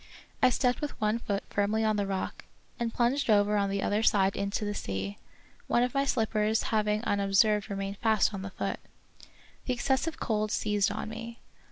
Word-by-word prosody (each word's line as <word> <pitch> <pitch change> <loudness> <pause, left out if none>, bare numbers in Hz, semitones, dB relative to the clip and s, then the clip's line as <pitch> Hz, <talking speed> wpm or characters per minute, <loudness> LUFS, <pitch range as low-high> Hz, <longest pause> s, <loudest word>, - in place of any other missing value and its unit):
I 255 - +6
stepped 250 0 +1
with 295 - -4
one 215 +2 +1
foot 200 -3 -2
firmly 210 +2 +1
on 215 -1 +2
the 205 -1 -1
rock, 195 -1 -4 0.3
and 235 -1 -1
plunged 250 +3 +1
over 205 0 +4
on 200 -1 +1
the 195 0 -1
other 210 +1 +1
side 195 -3 +3
into 200 +1 -2
the 205 - -2
sea, 95 - -4 0.5
one 240 - +3
of 250 - -1
my 275 0 +1
slippers 220 -3 +1
having 210 0 +1
unobserved 205 +1 +2
remained 195 0 -4
fast 220 -1 +2
on 195 - -4
the 195 - -5
foot. - - -3 0.9
The 255 - 0
excessive 270 +6 0
cold 215 -1 0
seized 210 -1 +1
on - - -4
me. 230 +1 -7
210 Hz, 185 wpm, -29 LUFS, 200-230 Hz, 0.9 s, I